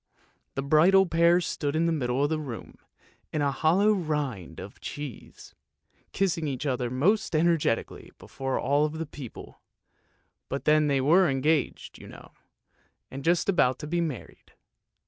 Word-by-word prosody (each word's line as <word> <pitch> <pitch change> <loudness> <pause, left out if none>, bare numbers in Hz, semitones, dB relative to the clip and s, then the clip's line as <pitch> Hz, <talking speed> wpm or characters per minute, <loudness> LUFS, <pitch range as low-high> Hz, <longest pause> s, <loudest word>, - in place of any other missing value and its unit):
The 135 - -2
bridal 170 +7 +5
pair 170 0 +4
stood 145 -3 -3
in 165 +1 +2
the 170 - +1
middle 130 -3 0
of 145 - 0
the 155 - 0
room, 130 -7 -8 0.5
in 155 - -1
the 140 -1 +1
hollow 180 +9 +3
rind 150 - -3
of - - -10
a - - -27
cheese, 145 -5 -9 0.6
kissing 170 -5 0
each 135 0 -4
other 125 -3 -1
most 165 - +1
energetically 155 -7 0
before 135 -1 -4
all 145 +2 +2
the 155 - -9
other 165 +1 -4
people, 140 -5 -11 0.9
but 140 - -4
then 150 0 +4
they 140 -2 +1
were 175 +6 +4
engaged, 140 +3 -1
you - - -12
know, - - -13 0.8
and 135 +1 -7
just 170 +2 +2
about 130 -10 +2
to - - -8
be 170 +3 -1
married. 155 -8 -7
150 Hz, 160 wpm, -27 LUFS, 135-170 Hz, 0.9 s, bridal